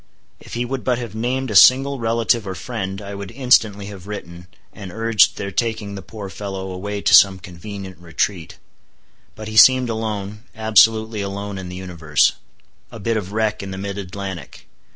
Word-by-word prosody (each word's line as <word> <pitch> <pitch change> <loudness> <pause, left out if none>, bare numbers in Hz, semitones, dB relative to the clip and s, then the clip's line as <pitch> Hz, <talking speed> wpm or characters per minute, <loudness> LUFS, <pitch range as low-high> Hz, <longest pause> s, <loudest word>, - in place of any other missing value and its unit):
If - - -10
he 120 +1 -1
would 130 +1 -4
but 125 -2 +1
have 120 -4 -6
named 125 +3 -2
a - - -3
single 135 +7 +6
relative 115 -1 +1
or 95 - -4
friend, 95 -1 -5
I 100 0 -7
would 100 -1 -7
instantly 115 -5 +2
have 100 -2 -10
written, 90 -4 -8 0.3
and 100 -4 -9
urged 115 -1 +3
their 100 - -4
taking 110 0 -2
the 100 - -7
poor 105 +1 -9
fellow 95 -1 -6
away 100 +2 -5
to 95 - +2
some 95 +1 +7
convenient 95 +1 -9
retreat. 85 +1 -3 0.8
But 110 0 -8
he 110 0 -5
seemed 130 +1 +7
alone, 105 -1 -4
absolutely 110 0 +3
alone 100 0 -5
in 90 -1 -7
the 90 - -7
universe. 85 -5 +1 0.6
A - - -9
bit 115 +3 -1
of 100 -3 -3
wreck 110 0 -1
in 100 - -7
the 95 - -6
mid 100 +1 -5
Atlantic. 95 -5 -7
100 Hz, 180 wpm, -20 LUFS, 95-115 Hz, 0.8 s, some